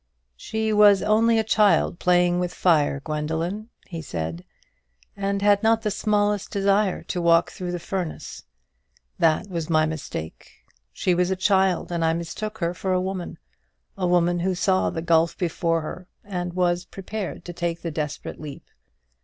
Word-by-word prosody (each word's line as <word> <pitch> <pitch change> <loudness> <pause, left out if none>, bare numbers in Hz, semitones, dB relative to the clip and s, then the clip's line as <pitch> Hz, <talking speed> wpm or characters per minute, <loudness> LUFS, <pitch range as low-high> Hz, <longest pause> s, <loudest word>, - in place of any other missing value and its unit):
"She 220 - -2
was 205 -2 +6
only 225 +2 +3
a 220 - +2
child 210 -4 +3
playing 175 0 +3
with 180 -1 -2
fire, 150 -5 +2
Gwendoline," 160 +8 -3 0.2
he 165 -3 -6
said; 85 - -5 0.7
"and 200 0 -2
had 205 -1 +4
not 225 0 +3
the 210 - 0
smallest 205 -1 0
desire 200 0 +1
to 180 - -3
walk 170 0 +4
through 180 -1 -5
the 175 - -2
furnace. 175 -1 -5 0.8
That 160 +3 +2
was 170 -4 -4
my 155 -1 +4
mistake. 155 - -6 0.4
She 180 - 0
was 180 +1 +1
a 190 - +1
child, 190 -2 +2
and 170 -1 -1
I 160 0 +3
mistook 210 +6 -5
her 170 -3 -1
for 185 +1 -2
a 185 - +2
woman 185 -1 -4 0.6
a 185 -3 -1
woman 175 0 +2
who 185 +1 0
saw 185 +1 +2
the 165 - -4
gulf 165 -1 +2
before 165 -1 0
her, 180 +3 -7 0.2
and 180 -3 -4
was 175 -1 +1
prepared 195 -2 -6
to 175 - -6
take 170 -1 -3
the 165 - -3
desperate 150 -1 -5
leap. 145 -3 -8
180 Hz, 165 wpm, -24 LUFS, 165-200 Hz, 0.8 s, was